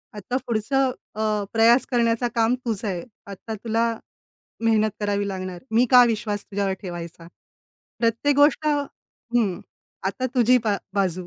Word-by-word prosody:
आता 225 +5 -3
पुढचं 255 +4 +1 0.2
अ, 215 -1 0
प्रयास 230 +3 +5
करण्याचं 235 0 +2
काम 230 +2 +3
तुझं 220 -2 -2
आहे. 180 -3 -3 0.2
आता 200 +3 -7
तुला 230 +2 0 0.7
मेहनत 220 -1 +3
करावी 205 -1 -1
लागणार. 185 -2 -5
मी 235 +3 +4
का 250 -1 +9
विश्वास 215 -3 -2
तुझ्यावर 200 -1 -2
ठेवायचा? 170 -2 -7 0.7
प्रत्येक 235 +5 +1
गोष्ट 290 +1 +4
हं, 240 -8 -2 0.5
आता 255 +6 -3
तुझी 250 +1 +5
बा 210 -2 +1 0.2
बाजू. 185 -3 -1
220 Hz, 135 wpm, -23 LUFS, 200-240 Hz, 0.7 s, का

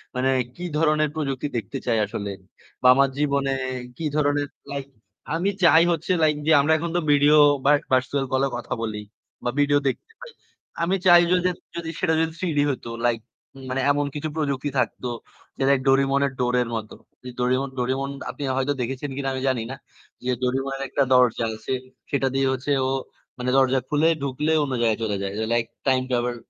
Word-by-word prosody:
মানে 130 +1 +1 0.3
কী 180 - -6
ধরনের 155 -1 +2
প্রযুক্তি 140 -2 -2
দেখতে 100 -4 -4
চাই 115 -2 +1
আসলে। 100 0 -5 0.5
বা 125 - +4
আমার 135 0 +4
জীবনে 140 -2 +1 0.5
কী 165 - -4
ধরনের, 145 -1 +1 0.2
লাইক 140 -1 -4 0.5
আমি 185 +4 +1
চাই 165 -1 +7
হচ্ছে, 165 +2 -1
লাইক 150 -1 +3
যে - - +5
আমরা 160 +3 +3
এখন 170 +1 -3
তো - - +3
ভিডিও 145 +1 +5 0.3
বা 145 0 +5
ভার্চুয়াল 130 +2 +1
কলেও 135 0 +1
কথা 120 - -5
বলি, 105 -2 -3 0.4
বা 120 - 0
ভিডিও 145 0 +4
দেখতে 290 - -3
পাই। - - -10 0.5
আমি 185 +3 +1
চাই 175 -1 +9
যদি 180 0 +3 0.3
যদি, 165 -1 -4
সেটা 160 - +1
যদি 160 0 +1
থ্রিডি 160 -6 0
হইত, 130 -3 -4 0.2
লাইক 115 -1 0 0.5
মানে 130 +1 -1
এমন 145 0 0
কিছু 155 +1 -3
প্রযুক্তি 145 -2 -1
থাকতো, 125 - -2 0.5
যেটা 135 0 +2
ওই - - -1
ডোরেমনের 135 +1 +3
ডোরের 125 -1 +1
মতো। 110 -1 -5 0.3
যে 125 - -7
ডোরেমন 130 +2 +1
ডোরেমন, 130 +2 -1 0.2
আপনি 145 - -6
হয়তো 140 +2 +1
দেখেছেন 135 +4 -3
কিনা 135 -1 -1
আমি 130 - -3
জানি 125 -4 0
না। - - -5 0.5
যে 125 - +1
ডোরেমনের 135 +2 -1
একটা 140 - +1
দরজা 125 -2 +4
আছে। 110 +4 -4 0.4
সেটা 135 -1 +1
দিয়ে 135 0 +2
হচ্ছে 130 +3 -3 0.2
ও, - - 0 0.5
মানে 125 0 -2
দরজা 130 0 +4
খুলে 150 +2 +3 0.2
ঢুকলে 145 +4 -1
অন্য 135 -2 -3
জায়গায় 115 -1 +2
চলে 105 -2 -1
যায়। 100 0 -3
যে 110 - 0
লাইক, 120 -1 +1 0.2
টাইম 130 -1 +3
ট্র্যাভেল 120 0 0
135 Hz, 185 wpm, -24 LUFS, 125-150 Hz, 0.5 s, চাই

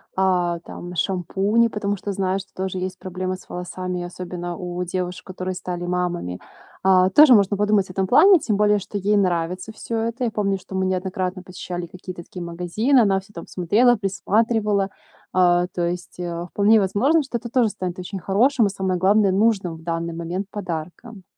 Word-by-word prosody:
а, 180 -2 +1
там 175 +1 -9
шампуни, 195 +6 +1
потому 205 -2 -2
что 200 +2 -4
знаю, 190 0 0
что 195 - -12
тоже 190 0 -3
есть 185 0 -4
проблемы 185 0 -4
с 185 - -15
волосами, 180 0 -4
особенно 175 0 -6
у 180 0 -5
девушек, 180 0 -4
которые 185 0 -4
стали 180 -1 -5
мамами. 175 - -2 0.4
А, 185 -1 +5
тоже 295 +6 +8
можно 200 -2 +4
подумать 205 -1 +2
об - - -6
этом 190 0 -1
плане, 375 - +7
тем 225 -7 -1
более 210 0 +3
что 200 +2 -6
ей 205 +2 +2
нравится 180 +2 -1
всё 225 +1 -4
это. 230 +3 -2
Я 235 - 0
помню, 200 -2 0
что 190 0 -10
мы 190 0 +1
неоднократно 185 0 -2
посещали 180 -1 -6
какие-то 185 0 -9
такие 180 - -9
магазины, 180 +10 +1
она 195 -3 +3
всё 195 +2 -17
там 170 - -8
смотрела, 215 +8 +3
присматривала. 205 0 +1 0.4
А, 180 -1 +4
то 175 -1 -2
есть, 175 +1 -5
а, 170 -1 -4
вполне 210 +4 +4
возможно, 225 - +2
что 265 -4 -3
это 235 +1 -8
тоже 240 -1 +3
станет 185 -4 -5
очень 190 +2 -5
хорошим, 230 +7 +3
а - - +1
самое 190 -1 -1
главное- 195 +2 +4
нужным 195 -4 +1
в 160 - -13
данный 165 0 -3
момент 170 +4 -4
подарком. 190 +3 -6
185 Hz, 185 wpm, -22 LUFS, 180-205 Hz, 0.4 s, тоже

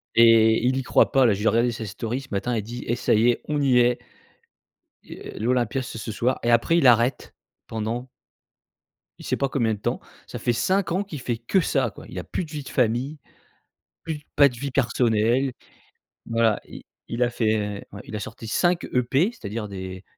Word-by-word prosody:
Et 115 0 +6
il 130 +1 +2
y 135 - -1
croit - - +3
pas 135 -2 +4
là, 110 - +4
j'ai 105 +3 -1
regardé 120 +2 +3
sa 115 -1 -5
story 115 +6 -4
ce 135 - -14
matin 110 +5 -1
elle 105 - -1
dit: 120 +3 -7
«Et 120 - +1
ça 120 - +1
y 115 +3 +4
est, 120 - 0
on 150 -1 0
y 130 -3 +4
est». 120 0 +5 1.1
Heu, - - -10
l'Olympia 125 +2 0
c'est 120 -2 -7
ce 110 - -5
soir, 125 +4 0
et 120 - +2
après 120 +9 +3
il 135 - +5
arrête, 120 +2 +3 0.3
pendant 115 +3 -4 1.1
il - - -11
sait - - -1
pas 140 -1 0
combien 115 -6 +1
de 105 - -6
temps. - - -2 0.3
Ça - - -7
fait 120 - +1
5 185 - 0
ans 190 +3 +1
qu'il 160 -8 -8
fait 120 -2 -2
que 120 - +1
ça, - - 0
quoi. - - -13
Il - - -9
a - - -5
plus 180 - -4
de 155 - -14
vie 150 -2 -5
de - - -9
famille, 125 +5 0 0.9
plus 160 -2 -4 0.2
pas 140 -1 +7
de 120 - -10
vie 140 +3 -4
personnelle. 120 0 +1 0.8
Voilà, 115 -2 +2
il - - -11 0.3
il 120 +1 0
a 120 - +2
fait, 110 -3 -1
ouais 100 - -8
il 105 - -6
a - - -5
sorti 110 +2 -8
5 175 +6 +1
EP, 130 - +2
c'est-à-dire 105 - -6
des 95 -1 -7
120 Hz, 210 wpm, -24 LUFS, 110-135 Hz, 1.1 s, pas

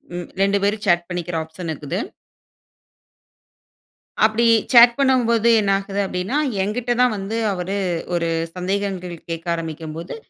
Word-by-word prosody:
ம் 175 -1 -6
2 200 +1 +3
பேரும் 205 +1 0
சேட் 175 0 +3
பண்ணிக்கிற 175 -1 -4
ஆப்ஷன் 160 +2 -8
இருக்குது. 155 +5 -4 2.3
அப்படி 220 +2 +1 0.3
சேட் 235 0 +8
பண்ணும்போது 235 -4 +3
என்ன 200 -1 +1
ஆகுது? 200 0 -5
அப்படின்னா, 190 +9 -2 0.3
என்கிட்ட 240 +4 -2
தான் 250 -3 +4
வந்து 195 +3 -4 0.2
அவரு 190 +2 -3 0.4
ஒரு 170 -1 0 0.3
சந்தேகங்கள் 185 -1 -3
கேட்க 165 0 -5
ஆரம்பிக்கும்போது, 165 0 -6
195 Hz, 120 wpm, -21 LUFS, 175-215 Hz, 2.3 s, சேட்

